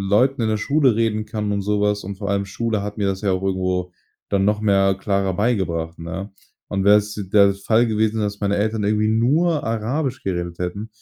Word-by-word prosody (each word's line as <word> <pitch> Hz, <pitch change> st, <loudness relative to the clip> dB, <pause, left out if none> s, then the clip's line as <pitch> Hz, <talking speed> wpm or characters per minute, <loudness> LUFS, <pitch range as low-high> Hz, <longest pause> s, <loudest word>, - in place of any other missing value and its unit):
Leuten 125 Hz, +5 st, +3 dB
in 110 Hz, -, +1 dB
der 110 Hz, -, +1 dB
Schule 140 Hz, +2 st, +2 dB
reden 110 Hz, -1 st, 0 dB
kann 105 Hz, -2 st, -3 dB
und 100 Hz, -1 st, -1 dB
so 105 Hz, +1 st, 0 dB
was. 105 Hz, 0 st, 0 dB
Und 100 Hz, +1 st, -6 dB
vor 100 Hz, +1 st, -5 dB
allem 100 Hz, 0 st, 0 dB
Schule 110 Hz, +1 st, -2 dB
hat 105 Hz, +1 st, -6 dB
mir 100 Hz, -, 0 dB
das 95 Hz, -1 st, -1 dB
ja 100 Hz, -2 st, +1 dB
auch 95 Hz, 0 st, -2 dB
irgendwo 90 Hz, -2 st, -1 dB, 0.4 s
dann 100 Hz, -1 st, +1 dB
noch 105 Hz, +1 st, +1 dB
mehr, 95 Hz, -2 st, +3 dB
klarer 100 Hz, -1 st, -1 dB
beigebracht, 90 Hz, -7 st, -1 dB
ne? 95 Hz, +4 st, -6 dB, 0.4 s
Und 95 Hz, -1 st, -1 dB
wäre 105 Hz, +1 st, +7 dB
es 105 Hz, 0 st, -1 dB, 0.2 s
der 100 Hz, -1 st, +6 dB
Fall 110 Hz, +4 st, +2 dB
gewesen 110 Hz, 0 st, 0 dB
ist, 110 Hz, -, 0 dB
dass -, -, -30 dB
meine 100 Hz, 0 st, 0 dB
Eltern 110 Hz, +1 st, 0 dB
irgendwie 105 Hz, +1 st, +1 dB
nur 145 Hz, +8 st, +2 dB
Arabisch 125 Hz, +5 st, -2 dB
geredet 85 Hz, -2 st, -3 dB
hätten 95 Hz, +5 st, -4 dB
105 Hz, 220 wpm, -21 LUFS, 95-110 Hz, 0.4 s, wäre